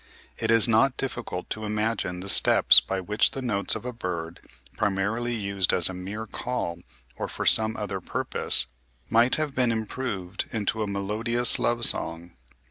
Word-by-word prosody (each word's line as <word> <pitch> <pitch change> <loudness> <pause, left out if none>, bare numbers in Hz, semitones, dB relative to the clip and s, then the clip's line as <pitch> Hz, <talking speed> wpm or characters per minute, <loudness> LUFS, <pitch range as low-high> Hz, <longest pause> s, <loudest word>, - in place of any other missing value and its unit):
It 110 - -2
is 115 +1 +5
not 125 +4 +3
difficult 105 -8 -4
to 110 - -4
imagine 105 -4 -2
the 95 - -8
steps - - +6
by 95 - -4
which 105 +3 +1
the 135 - -6
notes 100 -6 0
of - - -7
a 125 - -4
bird, 85 -6 -5 0.4
primarily 110 +5 -1
used 100 -3 -1
as 90 - +3
a - - -6
mere 100 +5 -6
call 100 -7 -4 0.4
or - - -4
for - - -5
some 110 0 +3
other 100 -3 -4
purpose, - - +2 0.5
might 115 +2 +4
have 155 -2 -3
been 125 -3 +1
improved 110 -4 -4
into 110 0 -2
a 105 - -1
melodious 110 +5 +2
love 120 0 +2
song. 85 +1 +2
105 Hz, 165 wpm, -25 LUFS, 95-115 Hz, 0.5 s, steps